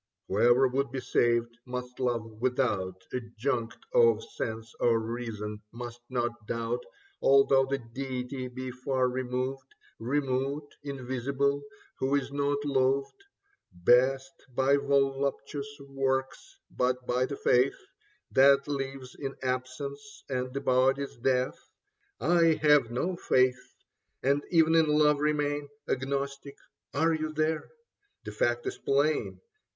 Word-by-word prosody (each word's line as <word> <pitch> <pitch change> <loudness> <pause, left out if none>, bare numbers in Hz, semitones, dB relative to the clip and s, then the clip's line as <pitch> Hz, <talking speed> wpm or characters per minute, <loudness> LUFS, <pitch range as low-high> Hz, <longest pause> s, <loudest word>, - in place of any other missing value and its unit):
Whoever 120 +6 +5
would 135 0 -1
be 135 - -3
saved, 120 -1 +1
must 125 0 -6
love 120 -3 0 0.2
without 105 -8 0
Adjunct 120 -1 -2 0.2
of 470 -2 +5
sense 115 - -5
or 115 -1 +3
reason, 110 -2 -5
must 120 0 -8
not 120 -3 -2
doubt 115 +1 -2 0.4
Although 135 -1 +5
the 140 +1 0
deity 130 +1 -5
be 130 +1 -6
far 130 0 0
removed, 130 +1 -3 0.2
Remote, 135 +3 -1
invisible; 140 +1 -1 0.4
who 135 +2 +1
is 140 0 -1
not 145 0 0
loved 135 0 +1 0.6
Best 125 - +3 0.2
by 135 +2 +4
voluptuous 140 +1 -1
works, 135 - -2
but 125 0 0
by 125 +1 +1
the 140 - -5
faith 125 +2 +3 0.5
That 140 +1 +5
lives 135 -2 -4
in 135 -1 -5
absence 130 +9 -4
and 130 -1 -2
the 140 +1 -3
body's 135 +2 +2
death. 125 +1 0 0.6
I 165 +5 +4
have 145 -6 +5
no 170 +10 -1
faith, 130 -4 +1 0.5
and 140 +2 +2
even 160 -2 +4
in 165 -1 +5
love 150 -1 +4
remain 145 -1 0 0.2
Agnostic. 140 +1 -3 0.3
Are 160 +3 +2
you 155 -1 -2
here? 155 0 0 0.5
The 105 - -6
fact 120 +3 0
is - - -4
plain. 145 +3 +1
135 Hz, 120 wpm, -29 LUFS, 125-140 Hz, 0.6 s, Whoever